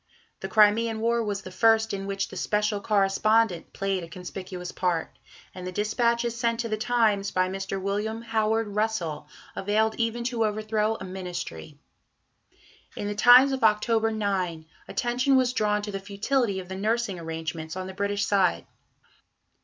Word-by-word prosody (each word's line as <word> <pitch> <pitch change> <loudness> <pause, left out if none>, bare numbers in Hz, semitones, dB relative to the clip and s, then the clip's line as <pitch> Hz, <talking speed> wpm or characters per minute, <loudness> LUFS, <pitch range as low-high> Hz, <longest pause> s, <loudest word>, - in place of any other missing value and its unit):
The - - -5
Crimean 220 +1 +3
War 235 +1 +1
was 200 -2 -3
the 185 - -9
first 225 +3 +3
in 195 0 -4
which 195 -1 -2
the - - -10
"Special 210 0 0
Correspondent" 210 -1 +2
played 195 -2 -2
a - - -7
conspicuous 180 +1 -7
part, 175 -3 -1 0.4
and 180 -1 -7
the - - -4
dispatches 235 +4 0
sent 235 -1 0
to 230 - -4
the 215 - 0
Times 215 -3 +1
by 185 -1 +1
Mr. 195 +1 -4
William 210 +4 -2
Howard 225 -1 0
Russell 200 -8 -2 0.3
availed 215 +2 +1
even 230 +1 -1
to 235 -1 0
overthrow 215 0 0
a 190 - -8
Ministry. 180 - -6 1.2
In 205 - -4
the 205 - -2
Times 245 +6 +7
of 265 -2 -2
October 220 +1 +3
9, 190 -7 -2 0.2
attention 250 +3 +1
was 255 -1 +3
drawn 210 -3 +1
to 205 - -4
the 195 - -4
futility 200 +2 -1
of 180 - -8
the 190 - -6
nursing 215 -1 -1
arrangements 160 0 -5
on 185 0 -4
the 190 - -7
British 200 +1 -1
side. 195 -3 +2
210 Hz, 160 wpm, -26 LUFS, 190-225 Hz, 1.2 s, Times